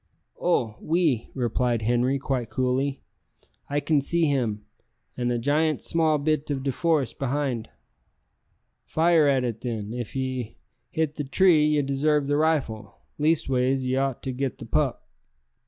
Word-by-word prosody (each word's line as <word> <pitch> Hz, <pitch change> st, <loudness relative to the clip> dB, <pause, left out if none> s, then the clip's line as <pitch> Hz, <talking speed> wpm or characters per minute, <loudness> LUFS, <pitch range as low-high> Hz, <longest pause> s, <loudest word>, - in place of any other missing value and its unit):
"Oh! 120 Hz, -11 st, +1 dB
oui," 160 Hz, -8 st, +1 dB
replied 120 Hz, -2 st, 0 dB
Henri 120 Hz, +4 st, +2 dB
quite 130 Hz, -4 st, -2 dB
coolly; 130 Hz, +2 st, -1 dB, 0.7 s
"I 145 Hz, +1 st, +1 dB
can 145 Hz, 0 st, +2 dB
see 170 Hz, +4 st, +1 dB
him, 115 Hz, -8 st, -1 dB, 0.5 s
an' 120 Hz, -1 st, -1 dB
a 120 Hz, -, 0 dB
goot 150 Hz, +5 st, +1 dB
small 160 Hz, -2 st, +2 dB
bit 150 Hz, 0 st, -1 dB
of 135 Hz, -2 st, -2 dB
de 135 Hz, -, 0 dB
forest 150 Hz, -3 st, 0 dB
beyond." 135 Hz, -4 st, -2 dB, 1.1 s
"Fire 165 Hz, -2 st, +3 dB
at 135 Hz, -2 st, +2 dB
it, 115 Hz, -2 st, -3 dB
then. 110 Hz, -3 st, -4 dB
If 120 Hz, -1 st, -6 dB
ye 130 Hz, -3 st, -3 dB, 0.3 s
hit 160 Hz, -2 st, -2 dB
the 145 Hz, -, -2 dB
tree 160 Hz, +3 st, +4 dB
ye 150 Hz, -1 st, +2 dB
desarve 140 Hz, +2 st, +1 dB
the 145 Hz, +1 st, +1 dB
rifle 150 Hz, -9 st, 0 dB, 0.2 s
leastways 135 Hz, -4 st, +1 dB
ye 130 Hz, 0 st, 0 dB
ought 135 Hz, -1 st, -1 dB
to 130 Hz, -, -2 dB
get 130 Hz, +1 st, -3 dB
the -, -, -9 dB
pup." -, -, -1 dB
135 Hz, 150 wpm, -25 LUFS, 125-150 Hz, 1.1 s, tree